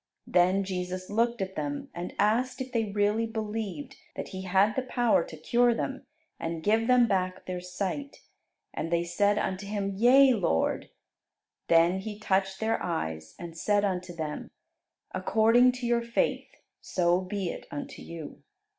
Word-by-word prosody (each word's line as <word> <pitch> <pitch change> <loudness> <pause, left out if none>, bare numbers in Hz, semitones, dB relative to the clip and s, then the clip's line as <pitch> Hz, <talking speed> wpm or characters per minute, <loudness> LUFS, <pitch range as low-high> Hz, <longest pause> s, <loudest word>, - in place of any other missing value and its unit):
Then 185 +2 +3
Jesus 185 0 -4
looked 230 0 +1
at 190 0 -6
them, 145 -1 -4
and 175 +1 -6
asked 245 +5 +1
if 260 0 -5
they 230 -2 +1
really 210 +2 +1
believed 225 +5 -4 0.2
that - - -5
He 190 0 -6
had 195 +3 +3 0.2
power 240 -8 +3
to 160 - -10
cure 240 +9 +3
them 265 +3 -4 0.3
and 165 -1 -4
give 220 +2 +2
them 250 -2 +5
back 185 -2 -1
their 180 -1 -4
sight. 195 +10 -4 0.5
And 165 - -4
they 170 0 +2
said 200 +4 +1
unto 190 0 -2
Him, 200 -1 -2
"Yea, 255 +6 +6
Lord." 175 - 0 0.8
Then 170 +3 +4
He 210 +1 -6
touched 195 -2 0
their 225 +1 0
eyes, 80 - -3
and 170 -1 -8
said 205 +4 +2
unto 180 -2 -2
them, 155 -3 -5 0.6
"According 235 +3 +4
to 250 -1 -5
your 235 0 +2
faith, 235 0 0 0.3
so 175 0 +1
be 185 -1 -3
it - - -9
unto 145 - -7
you." 165 -3 -9
195 Hz, 155 wpm, -28 LUFS, 180-225 Hz, 0.8 s, Yea